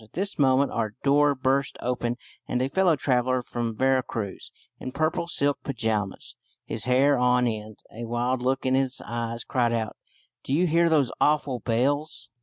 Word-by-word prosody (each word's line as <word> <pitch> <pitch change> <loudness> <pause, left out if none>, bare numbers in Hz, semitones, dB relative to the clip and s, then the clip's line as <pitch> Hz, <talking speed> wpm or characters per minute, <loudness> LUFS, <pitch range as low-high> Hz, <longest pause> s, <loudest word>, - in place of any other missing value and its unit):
At 110 - -20
this 200 0 -1
moment 135 0 +3
our 110 -2 -2
door 145 +1 +4
burst 135 +1 0
open, 120 -1 -2 0.3
and 125 - -1
a 130 +1 0
fellow 185 0 +3
traveller 130 -2 +1
from 115 -2 -4
Vera 130 +1 +3
Cruz, 105 -5 -6 0.3
in 130 - -6
purple 155 +4 -1
silk 145 -4 +1
pyjamas, 110 -6 -3 0.3
his - - -1
hair 135 +2 +3
on 125 0 +3
end, 110 -2 -4 0.2
a 115 +1 -6
wild 120 +2 -1
look 130 +1 0
in 130 - +2
his 130 -1 +1
eyes, 115 0 -3
cried 120 -2 0
out, 110 -2 -2 0.5
"Do 135 - -3
you 170 +5 +3
hear 170 0 +3
those 145 -6 +2
awful 145 -4 +2
bells?" 125 +1 -1
130 Hz, 175 wpm, -26 LUFS, 120-140 Hz, 0.5 s, door